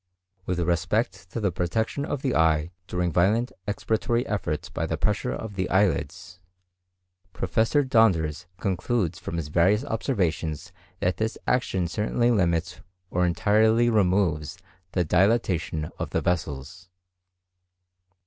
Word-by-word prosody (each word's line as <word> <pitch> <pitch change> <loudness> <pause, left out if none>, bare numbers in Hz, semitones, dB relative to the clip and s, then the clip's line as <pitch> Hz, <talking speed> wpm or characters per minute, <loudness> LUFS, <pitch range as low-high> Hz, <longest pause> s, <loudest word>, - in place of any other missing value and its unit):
With 90 -1 -1
respect 90 +3 0
to - - -3
the 100 -4 +1
protection 110 +10 -1
of 145 -2 -4
the 130 -3 +1
eye 80 0 +2 0.2
during 90 -1 -1
violent 105 +9 +2 0.2
expiratory 115 +3 0
efforts 85 -8 -2
by - - -3
the - - -2
pressure - - 0
of 100 - -5
the 95 -2 -2
eyelids, 90 -1 0 0.9
Professor 110 - +1
Donders 90 - +2
concludes 95 -1 -1
from 85 - -5
his 75 -3 -4
various 95 - +3
observations 90 - -2 0.3
that 90 - +1
this 110 +1 -2
action 95 -8 +1
certainly 115 +6 +1
limits 85 -6 0 0.3
or 90 0 +2
entirely 110 +6 +3
removes 90 -7 +1 0.4
the 90 -2 +1
dilatation 90 -4 +1
of - - -3
the - - -1
vessels. 90 +1 -3
95 Hz, 125 wpm, -26 LUFS, 85-110 Hz, 0.9 s, various